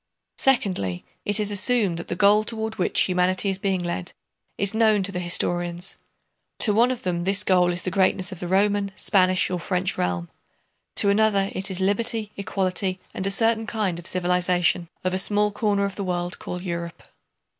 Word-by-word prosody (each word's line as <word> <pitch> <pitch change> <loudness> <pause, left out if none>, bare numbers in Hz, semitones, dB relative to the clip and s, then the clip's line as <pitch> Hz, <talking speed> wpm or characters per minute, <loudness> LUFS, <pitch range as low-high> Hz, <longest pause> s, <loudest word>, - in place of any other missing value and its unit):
Secondly, 190 - 0 0.2
it 205 +1 +1
is 210 -1 0
assumed 205 -3 +2
that 170 - -8
the - - -3
goal 205 +3 +4
toward 220 0 -4
which 180 - +3
humanity 185 +2 +1
is 190 - -4
being 190 -2 -1
led 175 - -4 0.4
is 200 +1 0
known 220 -2 +3
to 195 - +1
the 180 - -4
historians: 175 0 -1 0.6
to 210 - +2
one 235 +4 +4
of 255 -2 -4
them 175 -2 -2
this 195 +2 +2
goal 180 -2 +3
is 175 0 -2
the 185 - -2
greatness 190 0 +1
of 185 - -8
the 175 - -5
Roman, 200 +2 +1
Spanish, 185 -3 +2
or 180 - -2
French 180 +1 -1
realm; 85 -1 -1 0.7
to 200 - +3
another 200 -2 +2
it 190 +1 -2
is 190 -1 -2
liberty, 210 +2 -1
equality, 190 -1 -2
and 190 - -1
a - - +1
certain 225 +2 +2
kind 200 -7 -2
of 170 - -4
civilization 180 -1 +1
of 185 0 -1
a 185 - +1
small 210 +1 +3
corner 205 -1 0
of 200 -1 -5
the 200 - -3
world 175 -1 -3
called 180 0 -6
Europe. 170 -2 -5
190 Hz, 190 wpm, -23 LUFS, 180-205 Hz, 0.7 s, goal